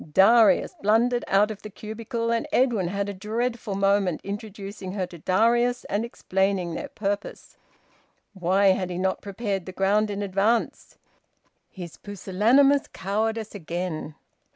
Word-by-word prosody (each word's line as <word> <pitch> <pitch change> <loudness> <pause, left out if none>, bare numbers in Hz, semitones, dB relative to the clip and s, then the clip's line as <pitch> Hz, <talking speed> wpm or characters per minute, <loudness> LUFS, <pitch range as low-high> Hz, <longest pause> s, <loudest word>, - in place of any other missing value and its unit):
Darius 220 +4 +5
blundered 235 +4 +2
out 205 +2 +3
of 210 - -8
the 215 - -8
cubicle 230 +3 -4
and 230 0 0
Edwin 235 -8 +2
had 200 +2 -2
a 205 - -4
dreadful 220 +2 -3
moment 195 -3 +2
introducing 200 -1 -7
her 190 -2 -1
to 175 -1 -12
Darius 235 +8 +2
and 205 +2 -1
explaining 190 -5 -1
their - - -5
purpose. 205 -1 -4 0.8
Why 190 +1 +3
had 185 -1 +1
he 175 - -4
not 190 +1 -1
prepared 200 -2 -4
the - - -5
ground 200 +3 +1
in 205 0 -3
advance? 200 +4 0 0.7
His 175 -4 -9
pusillanimous 225 +9 +2
cowardice 220 +3 -2
again! 170 -4 -5
200 Hz, 135 wpm, -25 LUFS, 190-225 Hz, 0.8 s, Darius